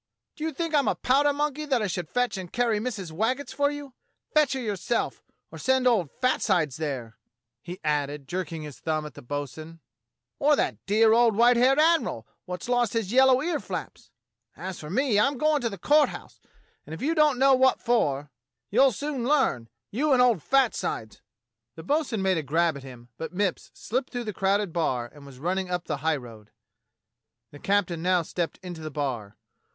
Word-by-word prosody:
"Do 310 - -7
you 320 - -1
think 330 +2 -4
I'm 285 -2 +3
a - - +2
powder 285 +3 +3
monkey 295 +1 -2
that 260 -6 +1
I - - +1
should 175 -4 -3
fetch 245 +4 0
and 185 -3 -7
carry 235 -3 +1
Missus 210 -7 -4
Waggetts 250 - -1
for 285 0 +2
you? 290 -2 -7 0.4
Fetch 300 -3 +4
her 265 - -2
yourself, 220 0 -2 0.3
or - - -9
send 260 -1 +2
old 215 - +3
fat 255 0 +1
sides 165 - +1
there," 130 -8 -5 0.4
he 180 +1 -8
added, 145 -2 -1
jerking 175 -2 -4
his 150 -3 -9
thumb 155 -1 -2
at 150 - -8
the - - -11
bo'sun, 145 +5 -6 0.6
"or 295 +1 +4
that - - -2
dear 220 +2 +5
old 230 -2 +4
white 240 +3 +5
haired 255 +3 +4
admiral 310 - +2 0.2
wot's 180 +3 -6
lost 245 -3 +1
his 225 -4 -1
yellow 260 +1 +5
ear 330 -2 -1
flaps. - - -7 0.5
As 190 -1 -6
for 150 - -8
me, 225 - +2
I'm 275 +6 +2
a - - -8
goin' 305 +1 +2
to 235 - 0
the 200 - -7
Court 295 - +4
House, - - -11 0.4
and 160 - -8
if 165 - -8
you 315 +4 +1
don't 300 -4 +3
know 270 +1 +5
what 260 0 +4
for, 145 - 0 0.4
you'll 260 +3 +5
soon 285 0 -3
learn 260 - +1
— 120 - -60
you 285 +6 +1
and 255 - +4
old 240 -8 +4
fat 270 - +3
sides." 110 -1 -4 0.5
The 160 - -9
bo'sun 260 - 0
made 190 -3 +2
a - - -2
grab 160 +3 +1
at 140 - -8
him, 125 -3 -12
but 160 - -5
Mipps 195 -2 -1
slipped 255 +4 -3
through 245 -1 -4
the 210 -2 -5
crowded 195 -1 0
bar 125 -8 -1
and 145 -1 -14
was 135 -2 -13
running 185 +6 -2
up 180 -1 -2
the - - -2
highroad. 125 -8 -3 1.0
The 145 - -12
captain 190 -4 0
now 180 0 +2
stepped 170 +1 -3
into 175 -3 -7
the 155 - -5
bar. 125 -8 -4
205 Hz, 200 wpm, -26 LUFS, 155-260 Hz, 1.0 s, dear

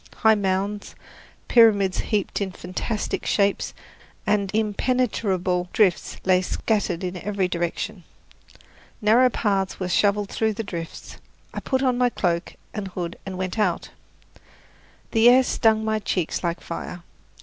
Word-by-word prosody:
High 220 0 +5
mounds, 200 0 -1 0.5
pyramids 205 -5 +5
heaped 205 -1 -1
in 190 -2 -2
fantastic 185 +5 -3
shapes, 200 -1 +1 0.5
and 200 -2 +1
impenetrable 210 -5 0
drifts 195 -5 +2
lay 185 -1 +4
scattered 190 -2 -1
in 180 0 -3
every 195 +1 -1
direction. 170 -1 -3 1.0
Narrow 235 +3 +5
paths 195 -5 -1
were 185 - -2
shoveled 205 +2 +2
through 220 -1 0
the 225 +2 -4
drifts. 170 -5 -7 0.4
I - - -3
put 265 -1 -1
on 250 -2 +2
my 250 0 +4
cloak 175 -6 -1 0.2
and 210 -2 -4
hood 175 -2 -5
and 185 -1 -5
went 185 +3 -3
out. 185 -5 0 1.2
The 225 +1 +6
air 255 +1 +6
stung 220 -3 +2
my 220 0 0
cheeks 185 -5 -2
like 170 0 -2
fire. 170 +1 -6
200 Hz, 135 wpm, -24 LUFS, 180-220 Hz, 1.2 s, The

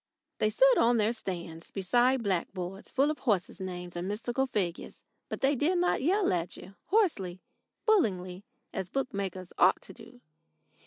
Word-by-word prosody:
They 215 - +3
stood 260 +5 +5
on 235 +1 +4
their 220 +1 +2
stands 170 -6 -6
beside 245 +6 +2
blackboards 185 0 -3
full 280 +3 +2
of 305 - -6
horses' 200 -4 0
names 180 -1 -6
and 175 +1 -3
mystical 240 +6 -1
figures, 190 -8 -3 0.3
but - - -5
they 275 +2 +3
did 325 +8 +2
not 355 -5 +2
yell 370 - +2
at 175 0 -2
you 190 - -11
hoarsely, 300 - +1 0.5
bullyingly, 190 - +1 0.3
as 190 -2 -3
bookmakers 195 -8 -3
ought 185 +2 +5
to - - -10
do. 240 +1 -15
205 Hz, 155 wpm, -30 LUFS, 185-265 Hz, 0.5 s, stood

